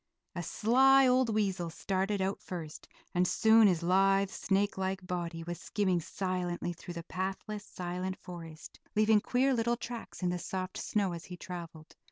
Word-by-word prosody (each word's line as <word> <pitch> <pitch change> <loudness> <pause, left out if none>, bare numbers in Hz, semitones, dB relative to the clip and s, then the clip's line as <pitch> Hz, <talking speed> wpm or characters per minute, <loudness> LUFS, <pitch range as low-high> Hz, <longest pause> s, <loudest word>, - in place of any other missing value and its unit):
A 175 - -3
sly 265 +9 +5
old 255 -1 +3
weasel 195 -5 0
started 195 +3 -1
out 195 +1 -2
first, 165 -4 -7 0.3
and 180 +1 +3
soon 220 +1 +6
his 175 -3 +1
lithe, 195 +2 +3
snake 200 +1 0
like 190 0 -2
body 170 -2 -3
was 175 +1 -5
skimming 190 -4 +1
silently 180 -1 -2
through 175 +1 -9
the 170 - -5
pathless, 195 +4 -4
silent 180 +1 -4
forest, 165 -3 -10 0.2
leaving 215 0 +5
queer 260 +4 +2
little 235 0 +1
tracks 235 -5 -7
in 180 - +2
the 180 - -2
soft 185 +1 -4
snow 200 -3 0
as 170 -1 -6
he 180 - -8
traveled. 170 -3 -8
190 Hz, 165 wpm, -31 LUFS, 175-210 Hz, 0.3 s, soon